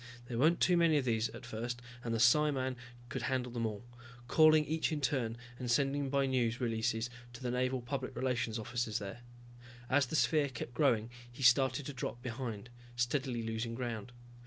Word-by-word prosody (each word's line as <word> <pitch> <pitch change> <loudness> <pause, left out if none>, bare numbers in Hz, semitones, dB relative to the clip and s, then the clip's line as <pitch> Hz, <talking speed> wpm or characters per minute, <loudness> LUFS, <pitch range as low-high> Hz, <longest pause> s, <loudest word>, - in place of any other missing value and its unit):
There 120 -1 -4
weren't 160 +5 +4
too 180 -1 +4
many 165 -3 +4
of 140 - 0
these 115 -2 +1
at - - -10
first 120 +1 -4 0.2
and 115 - -3
the 115 - +1
psiman 130 +1 +3 0.3
could - - -3
handle 130 -2 -1
them 115 -1 -1
all, 105 0 -6 0.4
calling 155 +1 +6
each 160 +2 0
in 155 - -1
turn 120 -4 0 0.2
and 125 -2 -4
sending 140 +3 +1
by 140 0 +2
news 125 -3 +1
releases 115 -1 -1 0.2
to 125 - -10
the 125 - -1
Naval 130 +1 0
Public 130 +1 -4
Relations 120 -3 -1
officers 115 -1 -2
there. 105 +2 -6 0.7
As 135 0 +4
the 140 - -3
sphere 150 -2 +3
kept 120 -1 -6
growing 120 -6 +2 0.2
he 130 +3 -7
started 130 +2 +4
to 145 - -5
drop 125 -2 -4
behind, 120 -2 -5 0.2
steadily 120 0 0
losing 115 +1 -3
ground. 120 -2 -4
125 Hz, 185 wpm, -34 LUFS, 115-135 Hz, 0.7 s, calling